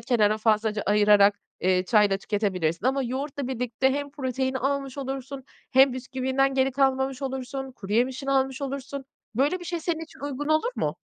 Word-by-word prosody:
kenara 220 -3 +2
fazlaca 215 -1 +1
ayırarak, 205 0 +5 0.2
eee, 185 0 +2
çayla 205 -2 +4
tüketebilirsin 195 -2 -1
ama 270 +1 +2
yoğurtla 270 +2 -3
birlikte 250 +1 0
hem 285 0 -3
proteini 260 -1 -2
almış 275 +1 -2
olursun 270 0 -5 0.3
hem 265 0 +6
bisküvinden 265 +1 0
geri 265 0 +2
kalmamış 265 0 +1
olursun, 265 0 -4
kuruyemişini 250 +6 -1
almış 265 0 +1
olursun. 275 0 -5 0.3
Böyle 290 +9 +1
bir - - -8
şey 345 -1 -3
senin 325 -1 -2
için 320 - -18
uygun 285 +1 -4
olur 315 +10 +2
mu? - - -1
265 Hz, 155 wpm, -26 LUFS, 225-275 Hz, 0.3 s, hem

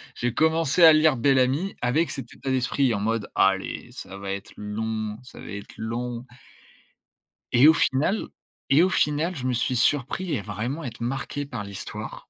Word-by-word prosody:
J'ai 120 -1 -2
commencé 160 +2 +2
à 160 - +11
lire 155 -2 +4
Bel-Ami, 135 +8 +2
avec 135 +5 +1
cet 135 - -7
état 135 - -6
d'esprit 130 -1 +1
en 100 - -1
mode: 110 0 -1
«Allez, 95 0 +1
ça 100 - -9
va 100 0 -5
être 100 +1 -6
long, 110 +1 -3
ça 125 - -13
va - - -10
être 100 0 -8
long». 120 +2 -4 1.3
Et 125 +5 +7
au 160 - +8
final 155 +10 +1 0.4
et 145 +5 +6
au 185 - +3
final 155 +2 +1
je 130 -2 -5
me 130 - +1
suis 120 +2 0
surpris 145 +5 +1
à - - -4
vraiment 115 - -4
être 120 -2 -7
marqué 135 +3 -3
par 125 -7 -6
l'histoire, 100 -1 -8
125 Hz, 175 wpm, -25 LUFS, 110-145 Hz, 1.3 s, à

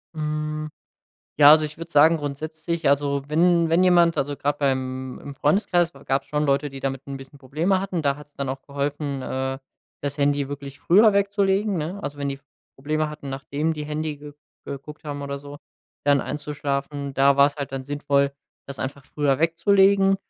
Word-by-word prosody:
Hm. 155 0 -3 0.7
Ja, 145 -1 +9
also 155 0 +7
ich 150 +1 -6
würde 165 0 -8
sagen 160 +2 +6
grundsätzlich, 155 +3 -3
also 140 0 +1
wenn 170 +1 +3
wenn 170 +2 +4
jemand 175 -2 +5
also 145 +1 -1
gerade 145 +1 -1
beim 130 -2 -2
im 140 -1 -8
Freundeskreis 175 +3 +2
gab 135 +1 +1
es - - -28
schon 150 0 0
Leute, 140 +1 +1
die 135 0 -9
damit 135 0 -3
'n 140 - -5
bisschen 135 +1 -12
Probleme 160 +8 0
hatten, 185 -4 -3
da 140 -1 +1
hat 150 -1 -12
es 145 - -31
dann 140 -1 -4
auch 135 0 -5
geholfen, 140 -1 -3
äh, 130 +1 -3 0.4
das 145 +1 -3
Handy 140 -1 +1
wirklich 140 -1 -7
früher 210 +4 +6
wegzulegen, 200 0 +1
ne? 175 +7 -4
Also, 145 0 -5
wenn 140 - -2
die 140 - -2
f 135 - -16 0.3
Probleme 155 +3 -1
hatten, 150 -2 -8
nachdem 140 +4 -2
die 150 -1 -5
Handy 150 0 -3
ge 145 0 -10 0.3
geguckt 145 +3 -8
haben 145 -1 -5
oder 140 0 -4
so, 145 +1 -10 0.5
dann 145 -1 +4
einzuschlafen, 140 -1 -4
da 140 +1 +4
war 140 0 +7
es 145 - -4
halt 140 -2 -5
dann 135 -1 -3
sinnvoll, 140 -1 +1 0.3
das 140 -1 -8
einfach 140 +1 -5
früher 145 -3 0
wegzulegen. 195 +4 +4
145 Hz, 190 wpm, -24 LUFS, 140-160 Hz, 0.7 s, Ja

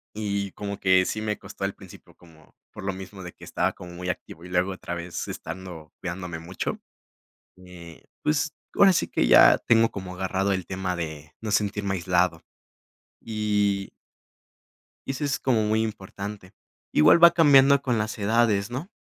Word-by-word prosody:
Y 100 -2 -2
como 100 -1 -6
que 95 -1 +4
si 110 - -3
me 105 -1 -2
costó - - -12
al 95 - -2
principio - - -15
como 80 -3 -21 0.2
por - - -9
lo 100 - -1
mismo 95 +1 -9
de 90 - -8
que - - -14
estaba - - -1
como 90 -1 -11
muy 90 +1 -6
activo 85 -1 -6
y - - -9
luego 90 +2 0
otra 90 -2 -6
vez 85 0 -5
estando 85 -2 -8
cuidándome 90 -2 -5
mucho, 85 +3 -4 0.9
eh, 85 -3 -13 0.2
pues, 150 0 0 0.2
ahora 195 -2 +6
sí - - +1
que - - 0
ya - - +8
tengo 115 -1 +3
como 95 -2 -7
agarrado 95 +1 0
el 95 -1 -3
tema 95 -1 -3
de 80 -2 -6
no 110 - -4
sentirme 100 -1 0
aislado. 90 -1 +1 0.8
Y 105 -3 -1 1.2
y 135 - -2
eso 145 +2 -4
es 140 - 0
como 120 -5 +2
muy 110 +1 +1
importante. 100 -2 -6 0.4
Igual 80 - +5
va 170 0 +10
cambiando 140 -4 +6
con 120 -4 0
las 110 +1 -3
edades, 105 0 +2
¿no? 135 +9 -5
95 Hz, 170 wpm, -25 LUFS, 90-110 Hz, 1.2 s, va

